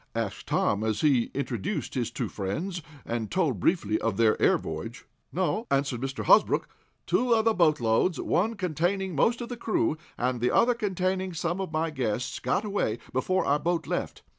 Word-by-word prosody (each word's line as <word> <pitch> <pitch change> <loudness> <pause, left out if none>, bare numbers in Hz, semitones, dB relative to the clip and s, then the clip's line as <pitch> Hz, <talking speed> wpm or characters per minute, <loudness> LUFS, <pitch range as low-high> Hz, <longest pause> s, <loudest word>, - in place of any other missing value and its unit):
asked 115 -4 -3
Tom, 100 +1 +1
as 110 -1 0
he 135 -6 +3
introduced 135 - -3
his 120 -4 -1
two - - -3
friends, 165 - -3 0.2
and 115 -2 -3
told 160 - 0
briefly 110 - +1
of 110 -4 -1
their 110 -2 +4
air - - +5
voyage. - - -6 0.3
"No," 190 +6 -1
answered 135 -3 0
Mr. 135 0 -3
Hosbrook, - - +4 0.4
"two 235 +7 +3
other 225 0 +3
boatloads, 155 - +2
one 220 +6 +1
containing 185 +1 -1
most 235 - +2
of 235 - -5
the 245 - -5
crew, 215 -8 0 0.2
and 125 -1 -1
the 125 - +3
other 245 - +4
containing 190 -4 -1
some 175 +3 -1
of 190 - -4
my 160 +1 0
guests, 125 -3 -2
got 210 - 0
away 200 - -1 0.2
before 185 +9 +1
our 145 +1 +2
boat 170 +2 -1
left. - - -3
160 Hz, 175 wpm, -27 LUFS, 120-190 Hz, 0.4 s, air